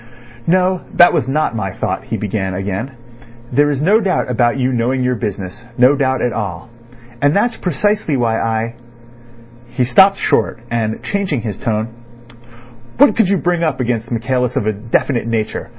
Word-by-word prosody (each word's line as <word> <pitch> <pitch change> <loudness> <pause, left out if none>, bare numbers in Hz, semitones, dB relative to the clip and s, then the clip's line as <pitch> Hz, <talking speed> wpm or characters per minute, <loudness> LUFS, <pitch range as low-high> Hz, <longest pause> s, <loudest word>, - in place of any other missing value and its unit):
"No, 185 +1 +2
that 175 - +7
was 120 - 0
not 140 -2 0
my 95 -4 -2
thought," - - -3
he - - -3
began 95 -3 -3
again. 100 +7 -4 0.6
"There 145 +3 +3
is 145 0 -1
no 205 +6 +4
doubt 190 - 0
about 120 +1 +2
you 130 0 0
knowing 125 +2 0
your 125 0 +1
business—no 115 +4 0
doubt 130 -2 0
at 120 - 0
all; 100 -2 -5 0.5
and 145 +2 +3
that's 230 +3 +2
precisely 185 -2 0
why 115 -2 0
I—" 115 0 -1 0.9
He 120 +1 -1
stopped 190 +11 +5
short, - - +1
and 110 -2 -2
changing 190 -11 -1
his 105 -3 -5
tone: 110 0 -1 1.1
"What 285 +3 +5
could 220 -5 +3
you 200 - +3
bring 175 -1 0
up 155 -5 0
against 120 -2 -1
Michaelis 125 +1 -1
of 130 -6 0
a 110 - +1
definite 115 +3 -1
nature? 115 0 -2
125 Hz, 165 wpm, -17 LUFS, 115-150 Hz, 1.1 s, that